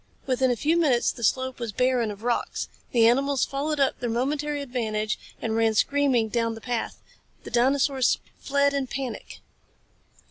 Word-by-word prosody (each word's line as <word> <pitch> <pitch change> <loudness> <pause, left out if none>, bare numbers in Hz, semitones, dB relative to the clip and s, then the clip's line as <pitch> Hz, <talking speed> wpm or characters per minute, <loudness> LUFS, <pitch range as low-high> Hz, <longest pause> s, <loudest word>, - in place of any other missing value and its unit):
Within 260 0 +1
a 245 - +2
few 310 +8 +1
minutes 275 -8 +3
the 235 - -9
slope 260 +3 0
was 235 -2 -3
barren 250 0 +1
of 205 +1 -8
rocks. 240 0 -1 0.2
The 230 -2 +5
animals 275 +3 +2
followed 290 +2 -2
up 275 -1 +1
their 240 - -2
momentary 285 +5 -1
advantage 220 -5 -2 0.2
and 225 -1 -2
ran 225 -1 +2
screaming 270 -2 +2
down 230 0 0
the - - -9
path. 240 0 -3 0.4
The - - -9
dinosaurs 265 +1 +2 0.2
fled 280 0 +1
in 275 -2 -1
panic. 255 -3 -6
255 Hz, 165 wpm, -25 LUFS, 230-280 Hz, 0.4 s, The